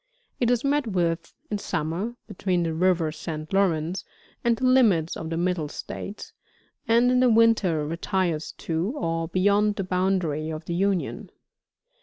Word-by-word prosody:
It 240 Hz, -, +2 dB
is 245 Hz, -1 st, +2 dB
met 285 Hz, -2 st, +1 dB
with, 170 Hz, -4 st, -1 dB, 0.2 s
in 205 Hz, -, -1 dB
summer, 170 Hz, +8 st, -2 dB
between 180 Hz, -1 st, -1 dB
the 165 Hz, -1 st, -1 dB
river 170 Hz, -1 st, +2 dB
St. 155 Hz, +1 st, -6 dB
Lawrence 180 Hz, -2 st, +1 dB, 0.4 s
and 235 Hz, -1 st, +2 dB
the 255 Hz, -, -1 dB
limits 220 Hz, -11 st, +4 dB
of 160 Hz, -, -5 dB
the 165 Hz, -, -2 dB
Middle 175 Hz, -3 st, 0 dB
States, 200 Hz, +6 st, -7 dB, 0.5 s
and 235 Hz, +2 st, +4 dB
in 250 Hz, -, +3 dB
the 255 Hz, -1 st, +5 dB
winter 220 Hz, -9 st, +3 dB
retires 170 Hz, 0 st, -1 dB
to, 170 Hz, -, -2 dB
or 165 Hz, -2 st, -1 dB
beyond 205 Hz, +4 st, +2 dB
the 195 Hz, -, -2 dB
boundary 180 Hz, -5 st, 0 dB
of 155 Hz, 0 st, -6 dB
the 170 Hz, -, -3 dB
Union. 190 Hz, 0 st, -1 dB
185 Hz, 155 wpm, -25 LUFS, 165-210 Hz, 0.5 s, the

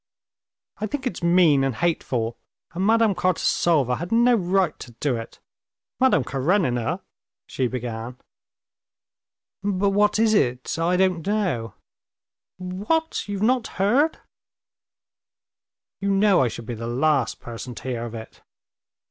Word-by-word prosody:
"I 215 Hz, -, -2 dB
think 265 Hz, +4 st, -4 dB
it's 200 Hz, -10 st, -3 dB
mean 170 Hz, -5 st, +4 dB
and 135 Hz, -3 st, -1 dB
hateful, 120 Hz, -5 st, -1 dB, 0.4 s
and 180 Hz, +2 st, -3 dB
Madame 225 Hz, 0 st, +4 dB
Kartasova 170 Hz, -7 st, +1 dB
had 175 Hz, +2 st, -6 dB
no 240 Hz, +2 st, +4 dB
right 190 Hz, -4 st, +1 dB
to 120 Hz, -, -10 dB
do 130 Hz, +2 st, -1 dB
it. 115 Hz, 0 st, -8 dB, 0.6 s
Madame 255 Hz, -, +4 dB
Karenina...." 135 Hz, -, 0 dB, 0.4 s
she 130 Hz, -, -1 dB
began. 120 Hz, 0 st, -5 dB, 1.5 s
"But 200 Hz, 0 st, +1 dB
what 205 Hz, +1 st, +3 dB
is 220 Hz, 0 st, +3 dB
it? 125 Hz, -, 0 dB
I 175 Hz, +2 st, +2 dB
don't 185 Hz, -3 st, +1 dB
know." 175 Hz, -, -1 dB, 0.8 s
"What? 205 Hz, -, -2 dB
you've 200 Hz, 0 st, -2 dB
not 245 Hz, +1 st, +2 dB
heard?" 245 Hz, +11 st, +2 dB, 1.8 s
"You 200 Hz, -, -1 dB
know 195 Hz, -1 st, +4 dB
I 130 Hz, -, +3 dB
should 115 Hz, 0 st, -7 dB
be 120 Hz, -, -5 dB
the 115 Hz, +1 st, -6 dB
last 135 Hz, +1 st, +1 dB
person 120 Hz, +1 st, -8 dB
to -, -, -10 dB
hear 120 Hz, -2 st, -3 dB
of 115 Hz, -1 st, -7 dB
it." 110 Hz, 0 st, -10 dB
175 Hz, 130 wpm, -23 LUFS, 125-205 Hz, 1.8 s, mean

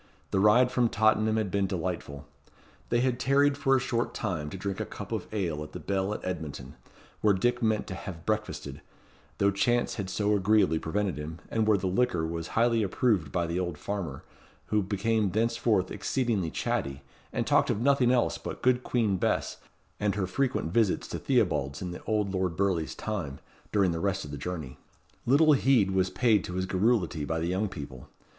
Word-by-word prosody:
The 95 Hz, -, +2 dB
ride 120 Hz, +5 st, +5 dB
from 120 Hz, -2 st, +2 dB
Tottenham 110 Hz, 0 st, +2 dB
had 105 Hz, -4 st, -1 dB
been 100 Hz, 0 st, +1 dB
delightful. 85 Hz, -6 st, -4 dB, 0.6 s
They 120 Hz, 0 st, +2 dB
had 125 Hz, -1 st, 0 dB
tarried 140 Hz, +2 st, +3 dB
for 135 Hz, -1 st, +2 dB
a -, -, +3 dB
short 120 Hz, -1 st, -2 dB
time 85 Hz, -8 st, -2 dB
to 95 Hz, -, -7 dB
drink 95 Hz, +1 st, -4 dB
a -, -, 0 dB
cup -, -, -8 dB
of -, -, -3 dB
ale 85 Hz, -8 st, -2 dB
at 75 Hz, 0 st, -8 dB
the -, -, -6 dB
Bell 95 Hz, 0 st, -1 dB
at -, -, -7 dB
Edmonton, 80 Hz, -6 st, -5 dB, 0.5 s
where 105 Hz, -2 st, +4 dB
Dick 120 Hz, +5 st, +1 dB
meant 110 Hz, -2 st, +1 dB
to -, -, -6 dB
have 90 Hz, -3 st, -8 dB
breakfasted, 110 Hz, 0 st, -3 dB, 0.6 s
though 100 Hz, 0 st, +3 dB
chance 120 Hz, +6 st, +1 dB
had 100 Hz, -3 st, -3 dB
so 105 Hz, +2 st, +1 dB
agreeably 100 Hz, -5 st, +3 dB
prevented 95 Hz, 0 st, -2 dB
him, 80 Hz, +2 st, -6 dB
and 110 Hz, -1 st, +1 dB
where 105 Hz, -2 st, +5 dB
the 95 Hz, -, -4 dB
liquor 95 Hz, -3 st, +1 dB
was 80 Hz, 0 st, -4 dB
highly 115 Hz, 0 st, +3 dB
approved 100 Hz, -, +1 dB
by 85 Hz, -1 st, 0 dB
the 85 Hz, +2 st, -2 dB
old 90 Hz, -4 st, -3 dB
farmer, 85 Hz, -8 st, -4 dB, 0.5 s
who 105 Hz, -1 st, +2 dB
became 105 Hz, +2 st, 0 dB
thenceforth 110 Hz, -1 st, +1 dB
exceedingly 115 Hz, -10 st, -1 dB
chatty, 70 Hz, 0 st, -2 dB, 0.3 s
and -, -, -1 dB
talked -, -, +3 dB
of -, -, 0 dB
nothing 135 Hz, 0 st, +3 dB
else 125 Hz, -2 st, +1 dB
but -, -, -7 dB
good 125 Hz, 0 st, +3 dB
Queen 110 Hz, -6 st, +1 dB
Bess -, -, -1 dB, 0.4 s
and 105 Hz, -1 st, 0 dB
her 100 Hz, -2 st, 0 dB
frequent 125 Hz, -4 st, -1 dB
visits 110 Hz, -5 st, +2 dB
to -, -, -4 dB
Theobalds 70 Hz, +1 st, +1 dB
in 90 Hz, -1 st, -4 dB
the 90 Hz, -, -8 dB
old 105 Hz, -3 st, 0 dB
Lord 95 Hz, -3 st, -1 dB
Burleigh's 95 Hz, -5 st, 0 dB
time, 90 Hz, -11 st, -4 dB, 0.3 s
during 100 Hz, -4 st, +3 dB
the 85 Hz, -, -2 dB
rest 100 Hz, 0 st, -1 dB
of 75 Hz, -, -8 dB
the 70 Hz, -, -5 dB
journey. 80 Hz, -5 st, -5 dB, 0.5 s
Little 150 Hz, +4 st, +6 dB
heed 130 Hz, -8 st, +3 dB
was 95 Hz, -1 st, +2 dB
paid 110 Hz, -4 st, +2 dB
to 90 Hz, -, -6 dB
his 95 Hz, 0 st, -1 dB
garrulity 95 Hz, -5 st, +1 dB
by 80 Hz, +3 st, -2 dB
the 80 Hz, -, -1 dB
young 95 Hz, +4 st, 0 dB
couple. 70 Hz, -7 st, -9 dB
100 Hz, 195 wpm, -28 LUFS, 90-115 Hz, 0.6 s, Little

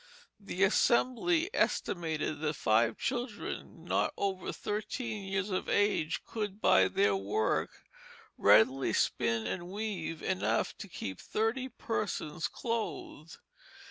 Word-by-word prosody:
The 195 Hz, -2 st, -2 dB
Assembly 255 Hz, -, +3 dB
estimated 160 Hz, -4 st, 0 dB
that 155 Hz, 0 st, -1 dB
five 110 Hz, 0 st, +2 dB
children 240 Hz, -3 st, -4 dB
not -, -, +1 dB
over 190 Hz, -2 st, -2 dB
thirteen 215 Hz, 0 st, -4 dB
years 195 Hz, +1 st, -1 dB
of 185 Hz, -, -2 dB
age 205 Hz, -6 st, +1 dB
could 210 Hz, -2 st, -4 dB
by 95 Hz, -, +5 dB
their 100 Hz, +2 st, +2 dB
work 100 Hz, +3 st, 0 dB, 0.7 s
readily 110 Hz, +7 st, +5 dB
spin 115 Hz, -1 st, +1 dB
and 175 Hz, +7 st, -4 dB
weave 190 Hz, -6 st, -4 dB
enough 190 Hz, -1 st, 0 dB
to 200 Hz, -, -7 dB
keep 95 Hz, -, -6 dB
thirty 230 Hz, +5 st, -1 dB
persons 190 Hz, -9 st, -3 dB
clothed. 220 Hz, -, -4 dB
190 Hz, 110 wpm, -31 LUFS, 150-220 Hz, 0.7 s, by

